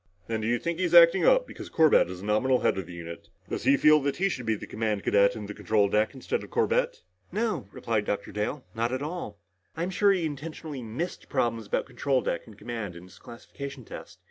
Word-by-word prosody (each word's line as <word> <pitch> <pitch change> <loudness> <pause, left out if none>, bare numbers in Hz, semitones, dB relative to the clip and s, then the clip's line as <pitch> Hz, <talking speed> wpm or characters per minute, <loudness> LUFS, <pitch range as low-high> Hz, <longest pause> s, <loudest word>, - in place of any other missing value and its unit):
"Then, 110 -1 -2
do 110 - -2
you 120 +1 +2
think 170 +5 -3
he's 175 -2 +1
acting 170 +2 +8
up - - +5
because - - -9
Corbett 160 - +4
is 90 0 -7
the - - -8
nominal 125 +5 +2
head - - +2
of 90 - -6
the 90 - -9
unit? 85 0 -9 0.2
Does - - -4
he 140 - +5
feel 150 +1 +6
that 140 0 -1
he 195 +2 +2
should 125 -10 -5
be 110 - +2
the - - -8
command 110 -2 -2
cadet 100 0 +4
in 105 - -6
the 105 - -6
control 105 -2 +1
deck 105 +4 +1
instead 130 - -3
of - - -11
Corbett?" 480 0 0 0.3
"No," 215 - -1
replied 110 -3 -1
Dr. 105 - -3
Dale. 105 +6 -3
"Not 115 +1 -1
at 130 +2 -2
all. 150 - -5 0.4
I'm 175 +3 -2
sure 200 +2 +4
he 185 -4 +1
intentionally 150 -1 -6
missed 120 +11 -5
problems 115 -5 -1
about - - -1
control 135 -2 0
deck 85 - -3
and 110 -3 -14
command 105 -4 -5
in 85 - -10
his 90 0 -16
classification 135 +2 -9
test. - - -10
120 Hz, 230 wpm, -27 LUFS, 105-160 Hz, 0.4 s, acting